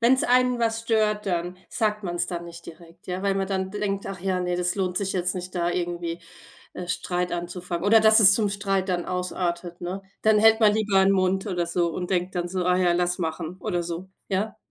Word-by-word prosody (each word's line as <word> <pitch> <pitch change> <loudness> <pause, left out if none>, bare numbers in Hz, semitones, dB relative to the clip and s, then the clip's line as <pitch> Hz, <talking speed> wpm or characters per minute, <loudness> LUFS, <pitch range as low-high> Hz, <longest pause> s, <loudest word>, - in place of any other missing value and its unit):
wenn's 255 +3 +4
einen 250 0 +3
was 225 -1 0
stört, 215 -2 0
dann 175 -1 -2
sagt 215 -2 -1
man's 175 -2 -2
dann 170 -1 -5
nicht 170 0 -11
direkt, 170 +1 -14
ja, 185 +1 -4
weil 200 -1 +1
man 195 0 0
dann 190 -1 -2
denkt: 200 -1 -3
„Ach 195 -1 -5
ja, 185 0 -1
ne, 180 0 -1
das 180 0 0
lohnt 185 -2 -2
sich 195 0 -1
jetzt 180 -1 -1
nicht, 180 0 -6
da 175 -1 0
irgendwie 175 -1 -3 0.5
äh, 180 - -7
Streit 180 0 -2
anzufangen 175 0 -4
oder 220 +2 +6
dass 220 0 +7
es 200 -3 +8
zum 215 -1 +1
Streit 195 -1 -1
dann 175 -2 -1
ausartet“, 180 -1 -3
ne? 180 +2 -5 0.2
Dann 215 -1 +4
hält 220 +1 +6
man 215 -2 +6
lieber 210 -3 +2
'n 195 +1 +4
Mund 190 0 +1
oder 175 -4 -1
so 170 0 0
und 180 +2 -5
denkt 180 0 -1
dann 175 -1 -2
so: 185 0 -2
„Ah 180 0 +3
ja, 180 -1 +3
lass 175 0 0
machen 165 0 -4
oder 175 -1 -1
so.“ 170 +2 -6 0.2
Ja. 200 +4 -2
185 Hz, 225 wpm, -25 LUFS, 175-200 Hz, 0.5 s, es